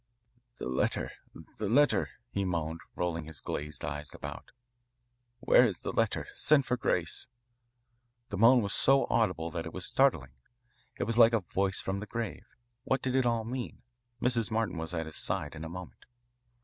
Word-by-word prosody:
"The - - -5
letter 65 0 0 0.5
the 105 -2 -1
letter," 145 +6 +3 0.2
he 100 - -1
moaned, 85 -3 -2 0.2
rolling 85 -2 -2
his 80 -4 -7
glazed 75 0 -4
eyes 75 0 -4
about. - - -8 0.9
"Where - - +6
is 105 -8 0
the - - -4
letter? - - +1
Send 145 -3 +4
for 125 - +1
Grace." 90 -8 -1 1.0
The 100 - -4
moan 120 +2 +7
was 100 - -1
so 135 0 +5
audible 90 -7 +1
that 85 0 -4
it 80 - -8
was 90 -1 -5
startling. 80 - +2 0.7
It - - -1
was 115 +1 0
like 115 0 +8
a 115 - +3
voice 95 +2 -1
from 95 +1 -2
the 105 - -7
grave. 115 -3 -5 0.4
What 130 0 0
did 130 - 0
it 130 -2 +3
all 115 -1 +1
mean? 125 +1 -5 0.4
Mrs. 120 -2 +2
Martin 110 -6 -1
was 80 +2 -4
at 80 -1 -2
his 80 - -7
side 75 - -1
in 80 0 -7
a 80 - -5
moment. 90 +1 -9
100 Hz, 175 wpm, -30 LUFS, 80-120 Hz, 1.0 s, like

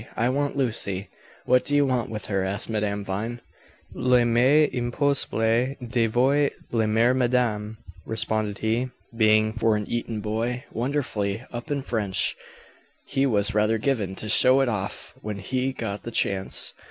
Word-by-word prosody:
I 120 +2 +2
want 145 +2 -1
Lucy!" 100 -7 -2 0.4
"What 125 0 +4
do 145 - 0
you 145 0 +4
want 125 -3 0
with 105 -3 -5
her?" 95 -1 -1
asked 100 +4 -2
Madame 105 -2 -1
Vine. 105 +5 -4 0.6
"Il 125 -1 +3
m'est 125 +6 +4
impossible 125 -1 +1
de 115 -1 +1
vous 135 +5 +3 0.2
le 110 -2 +1
dire 115 +3 +3
madame," 120 -4 0 0.3
responded 110 -2 -1
he. 115 +4 0 0.3
Being, 110 -1 +4
for 115 -1 +2
an 105 0 -2
Eton 115 -2 -3
boy, 115 +4 -2
wonderfully 115 -5 -2
up 120 +5 -6
in 140 -2 -1
French, 105 -7 0 0.7
he 140 0 +1
was 105 -2 +1
rather 105 +1 +2
given 110 -6 -1
to 110 - -6
show 130 +5 +5
it 135 - +2
off 100 -3 -4
when 105 -1 -4
he 130 +7 -1
got 105 -5 -5
the - - -6
chance. 95 -4 +1
115 Hz, 155 wpm, -25 LUFS, 105-125 Hz, 0.7 s, show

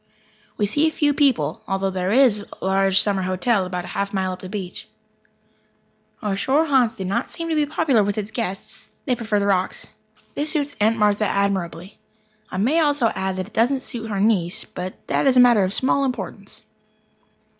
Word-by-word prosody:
We 210 - +1
see 295 +10 +2
few 295 -2 +1
people, 245 - +1
although 195 0 -1
there 185 0 -2
is 235 -4 +4 0.2
a - - -4
large 195 0 +3
summer 200 -2 +1
hotel 185 +2 0
about 180 -1 -5
a 200 - -7
mile 190 -1 0
up 185 - -7
the 185 - -8
beach. 190 -3 -6 1.4
Our 205 -2 0
shore 275 +10 +2
haunts 255 -6 +2
do 190 - -5
not 200 +7 -1
seem 330 -1 -5
to 320 - 0
be 300 -1 +2
popular 280 -7 +2
with 200 +1 -2
its 210 0 -3
guests. 215 -6 -5 0.2
They 255 - +1
prefer 220 -3 -1
the 200 - 0
rocks. 190 -2 0 0.4
This 295 +2 -1
suits 290 -2 -2
Aunt 220 +2 +3
Martha 210 0 +2
admirably. 195 -2 -2 0.5
I - - -5
may 255 - +2
also 290 -7 +2
add 190 0 -2
that 185 0 -3
it - - -30
doesn't 255 +4 +1
suit 225 -2 -7
her 200 -2 -2
niece 195 -5 +1
but 180 +1 -6
that - - +1
is 260 -1 +4
a - - +8
matter 240 -5 +6
of 185 - 0
small 260 +5 +1
importance. 260 -2 -5
210 Hz, 190 wpm, -22 LUFS, 190-260 Hz, 1.4 s, a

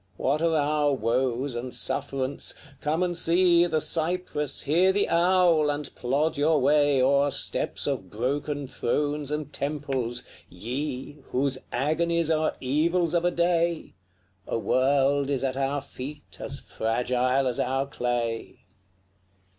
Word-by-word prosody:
What 145 +4 0
are 165 -1 +2
our 150 0 +2
woes 125 +3 0
and 120 +2 -4
sufferance? 135 -1 -2 0.2
Come 155 +4 0
and 175 -1 -1
see 175 +1 +4
The 160 -2 +1
cypress, 160 -3 -2
hear 175 +6 +4
the 200 +1 +1
owl, 170 -3 +4
and 145 0 -3
plod 140 +6 0
your 150 +1 +3
way 145 -2 +3
O'er 140 +2 +4
steps - - -1
of 95 - -2
broken 140 +6 -2
thrones 145 +3 -1
and 150 -1 -4
temples, 135 -4 -2 0.2
Ye! 130 - -5
Whose 130 0 0
agonies 165 +5 +1
are 155 0 +1
evils 165 +6 +1
of 170 0 +2
a - - +5
day 170 -1 0 0.5
A - - -1
world 135 +3 +2
is 140 -2 0
at 130 -1 0
our 135 +1 -1
feet 145 +4 -9
as - - -5
fragile 125 +3 0
as 125 -2 -1
our 135 +2 0
clay. 120 -6 -3
145 Hz, 135 wpm, -26 LUFS, 130-160 Hz, 0.5 s, a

